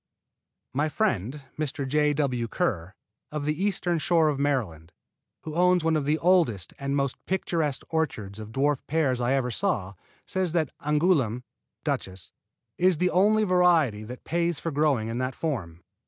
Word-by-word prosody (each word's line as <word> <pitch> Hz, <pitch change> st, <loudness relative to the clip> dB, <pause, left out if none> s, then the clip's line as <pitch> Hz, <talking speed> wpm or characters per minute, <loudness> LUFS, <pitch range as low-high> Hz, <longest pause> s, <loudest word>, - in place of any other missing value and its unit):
My 145 Hz, +4 st, +1 dB
friend, 140 Hz, -, -1 dB, 0.2 s
Mr. 140 Hz, -2 st, -2 dB
J. 150 Hz, +2 st, +2 dB
W. 130 Hz, -5 st, 0 dB
Kerr, 90 Hz, -2 st, -2 dB, 0.4 s
of 150 Hz, -1 st, -3 dB
the 150 Hz, +5 st, -1 dB
Eastern 180 Hz, -4 st, 0 dB
Shore 160 Hz, -1 st, +3 dB
of 140 Hz, -2 st, -2 dB
Maryland, 105 Hz, -, -1 dB, 0.5 s
who 155 Hz, -, -6 dB
owns 180 Hz, +1 st, +3 dB
one 160 Hz, 0 st, +2 dB
of 150 Hz, -3 st, 0 dB
the 150 Hz, +2 st, +2 dB
oldest 160 Hz, -, +2 dB
and 140 Hz, 0 st, -2 dB
most 140 Hz, -2 st, -1 dB
picturesque 165 Hz, -6 st, -1 dB
orchards 130 Hz, -11 st, -2 dB
of 110 Hz, 0 st, -8 dB
dwarf 140 Hz, +3 st, +1 dB
pears 140 Hz, -5 st, +1 dB
I 120 Hz, +2 st, +2 dB
ever 130 Hz, -2 st, 0 dB
saw, 110 Hz, -, -1 dB, 0.3 s
says 185 Hz, -3 st, -1 dB
that 160 Hz, -5 st, +1 dB
Angouleme 150 Hz, -, +2 dB, 0.4 s
(Duchess) 95 Hz, -1 st, -4 dB, 0.5 s
is 180 Hz, -1 st, +4 dB
the 180 Hz, +3 st, +1 dB
only 215 Hz, +4 st, +4 dB
variety 175 Hz, -, +3 dB
that 125 Hz, +3 st, -9 dB
pays 170 Hz, -1 st, 0 dB
for 165 Hz, -, -3 dB
growing 140 Hz, -6 st, +1 dB
in 115 Hz, +2 st, -3 dB
that 130 Hz, 0 st, -2 dB
form. 95 Hz, -, -4 dB
145 Hz, 160 wpm, -26 LUFS, 125-170 Hz, 0.5 s, is